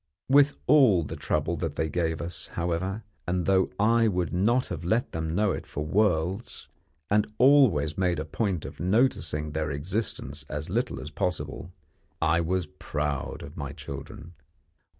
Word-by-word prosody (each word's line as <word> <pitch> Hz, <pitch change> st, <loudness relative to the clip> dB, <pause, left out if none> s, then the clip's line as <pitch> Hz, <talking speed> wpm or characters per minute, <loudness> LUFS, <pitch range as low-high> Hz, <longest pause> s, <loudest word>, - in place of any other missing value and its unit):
With 140 Hz, +1 st, +5 dB
all 125 Hz, -, +6 dB
the -, -, -6 dB
trouble -, -, -1 dB
that -, -, -3 dB
they 80 Hz, -, 0 dB
gave 80 Hz, -1 st, -1 dB
us, 80 Hz, -2 st, -4 dB
however, 90 Hz, +5 st, -2 dB, 0.2 s
and 90 Hz, -1 st, 0 dB
though 95 Hz, -1 st, +3 dB
I 115 Hz, +2 st, +4 dB
would 90 Hz, -4 st, -1 dB
not 115 Hz, +8 st, +2 dB
have 85 Hz, -2 st, -5 dB
let 110 Hz, +8 st, 0 dB
them 80 Hz, 0 st, -3 dB
know 105 Hz, 0 st, +2 dB
it -, -, -5 dB
for 75 Hz, -, -4 dB
worlds, 95 Hz, +2 st, 0 dB, 0.4 s
and 105 Hz, +1 st, +2 dB
always 115 Hz, -, +5 dB
made 90 Hz, -2 st, +2 dB
a 75 Hz, -, -3 dB
point 90 Hz, +1 st, -2 dB
of -, -, -9 dB
noticing 85 Hz, -, +1 dB
their 75 Hz, 0 st, -2 dB
existence 75 Hz, -, -3 dB
as 75 Hz, +3 st, -4 dB
little 120 Hz, +5 st, -1 dB
as 75 Hz, -, -7 dB
possible, 90 Hz, +2 st, -3 dB, 0.5 s
I 80 Hz, +1 st, +3 dB
was 90 Hz, +1 st, 0 dB
proud 75 Hz, -2 st, -4 dB
of 70 Hz, +2 st, -10 dB
my 70 Hz, -3 st, -5 dB
children. 70 Hz, +4 st, -8 dB
90 Hz, 160 wpm, -27 LUFS, 80-105 Hz, 0.5 s, all